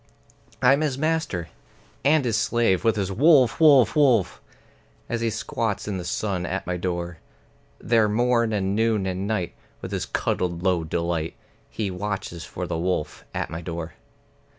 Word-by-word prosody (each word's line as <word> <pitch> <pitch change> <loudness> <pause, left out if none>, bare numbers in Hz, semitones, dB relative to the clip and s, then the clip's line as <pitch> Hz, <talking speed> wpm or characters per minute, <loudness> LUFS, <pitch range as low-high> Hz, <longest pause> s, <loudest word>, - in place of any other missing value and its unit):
I'm 135 +4 +5
his 145 -4 0
master 155 - -1 0.5
(and 145 0 +4
his 115 -3 +1
slave, 110 -3 +2
with 115 -1 +3
his 100 -2 -2
"Wolf, 135 - +4
wolf, 140 -8 +6
wolf!") 125 - +3 0.7
As 120 -1 -2
he 115 - +1
squats 110 -1 -3
in 100 -2 -2
the - - -5
sun 90 +1 -2
at 95 +3 -3
my 90 - -2
door. 85 -1 -3 0.6
There 115 -2 +2
morn 115 +1 +2
and 100 -2 0
noon 110 -2 +1
and 95 +1 -2
night, 105 -5 -2 0.3
with - - -7
his - - -2
cuddled 85 -1 -1
low 90 -3 +2
delight, 85 0 -2 0.3
He 105 -4 -3
watches 95 -3 -4
for 90 +2 -5
the 85 -2 -3
wolf 90 -3 -2
at - - -3
my 80 +1 -5
door. 85 -1 -5
100 Hz, 160 wpm, -24 LUFS, 90-120 Hz, 0.7 s, wolf